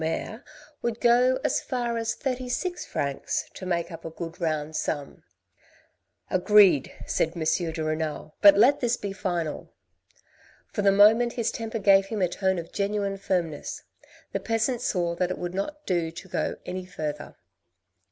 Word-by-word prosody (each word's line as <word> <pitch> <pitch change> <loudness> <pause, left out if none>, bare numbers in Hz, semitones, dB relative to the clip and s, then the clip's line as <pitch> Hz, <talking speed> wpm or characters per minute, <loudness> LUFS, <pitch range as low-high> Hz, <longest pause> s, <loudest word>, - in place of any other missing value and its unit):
mayor 190 +7 -3 0.4
would 235 -1 -2
go 250 +2 +4
as - - +1
far 240 -2 -2
as 225 -1 -1
thirty 255 -1 -3
six 360 +7 -2
francs, 140 -1 -2
to 185 - -7
make 170 -1 -1
up 165 0 -9
a - - -5
good 165 +1 -8
round 155 -1 -1
sum." 145 -3 -3 0.6
" - - -38 0.3
Agreed! 185 -6 +5
" - - -6
said 165 - 0
M. 165 - -2
de 160 0 0
Renal, 155 -1 -3
" - - -49
but 200 -1 +9
let 245 +7 +5
this 240 -1 +1
be 200 -1 -5
final." 175 -6 -3 1.0
For 205 - -1
the 200 -1 +5
moment 220 +4 +5
his 235 -3 -1
temper 225 0 -4
gave 195 -2 +5
him 215 0 -3
a - - +4
tone 190 +1 0
of 170 -1 -6
genuine 200 -1 -1
firm 180 -4 0
ness. - - -7 0.5
The - - -1
peasant 230 +2 0
saw 175 -3 0
that 180 0 +1
it 185 - -3
would 175 0 -4
not 295 +11 -4
do 175 -3 0
to 170 +3 -10
go - - -2
any 185 0 -5
further. 150 -5 -5
195 Hz, 180 wpm, -26 LUFS, 165-225 Hz, 1.0 s, but